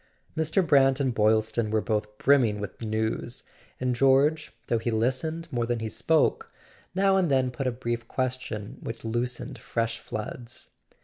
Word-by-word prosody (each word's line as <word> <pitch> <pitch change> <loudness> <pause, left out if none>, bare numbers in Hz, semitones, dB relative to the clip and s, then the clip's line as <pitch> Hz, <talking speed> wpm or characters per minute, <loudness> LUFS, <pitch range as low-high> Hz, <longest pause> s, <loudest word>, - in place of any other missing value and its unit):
Mr. 160 +4 +2
Brant 135 -3 +4
and 130 -3 +1
Boylston 110 +1 +2
were 110 +1 +2
both 105 0 -2
brimming 120 -7 +3
with 105 +2 -7
news, 110 +2 -2 0.4
and 125 0 0
George, 135 +4 +3
though 115 - +1
he 120 - -2
listened 130 +9 -1
more 120 -1 0
than 120 0 0
he 110 -1 -3
spoke, 450 - +1 0.4
now 195 0 +4
and 180 -4 +2
then 130 -2 +2
put 130 +1 -3
a - - +2
brief 120 -1 -4
question 130 -3 -3
which 115 0 -7
loosened 120 +2 -2
fresh 115 -1 -2
floods. 115 +2 -7
120 Hz, 160 wpm, -27 LUFS, 110-135 Hz, 0.4 s, Brant